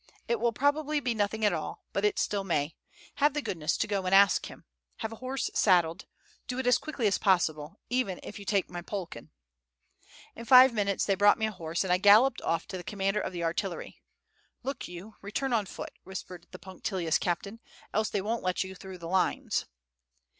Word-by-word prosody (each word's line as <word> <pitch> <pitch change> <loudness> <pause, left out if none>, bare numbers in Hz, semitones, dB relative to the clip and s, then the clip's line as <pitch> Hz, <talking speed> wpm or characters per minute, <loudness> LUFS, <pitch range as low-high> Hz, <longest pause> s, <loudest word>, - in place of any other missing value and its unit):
It 235 -1 0
will 235 +1 +2
probably 290 +4 +1
be 250 -4 -1
nothing 215 0 0
at 205 - +3
all, - - -5
but 420 -1 +1
still 205 -1 0
it - - -9
may. 155 -4 -1 0.4
Have 290 0 +3
the 295 - 0
goodness 155 -4 -1
to - - +1
go 195 -2 -2
and 190 - +4
ask 200 0 +5
him. - - -13 0.3
Have 220 -1 -4
a 225 - -8
horse 255 +2 -3
saddled. 175 -3 +2 0.4
Do 250 - -4
it 260 - -2
as 245 0 +4
quickly 280 -7 -4
as 200 - +2
possible, 165 -2 +1
even 245 -7 -1
if 210 - -8
you 200 - -10
take 195 -2 +1
my 175 -1 -6
Polkan." 185 0 -6 1.1
In 230 - -8
five 255 0 +8
minutes 200 -3 0
they 200 - +2
brought 205 +1 +5
me 220 - 0
a 220 - -2
horse, 170 -2 -3
and 185 -2 +1
I 180 - +2
galloped 215 +7 +6
off 165 - -1
to 190 - -4
the 175 - -7
commander 195 +1 -1
of - - -4
the 175 -2 -4
artillery. 170 +2 -3 0.6
"Look 270 0 -4
you, 180 +5 -10
return 240 +6 -2
on 215 -4 +1
foot," - - -7
whispered 180 -2 -8
the 185 - -10
punctilious 185 -3 -2
captain, 200 +5 -3 0.3
"else 215 +1 +1
they 200 - -1
won't 225 +4 -2
let 185 0 0
you 190 0 -8
through 190 0 -10
the 170 -1 -8
lines." 185 +2 0
200 Hz, 205 wpm, -29 LUFS, 180-230 Hz, 1.1 s, five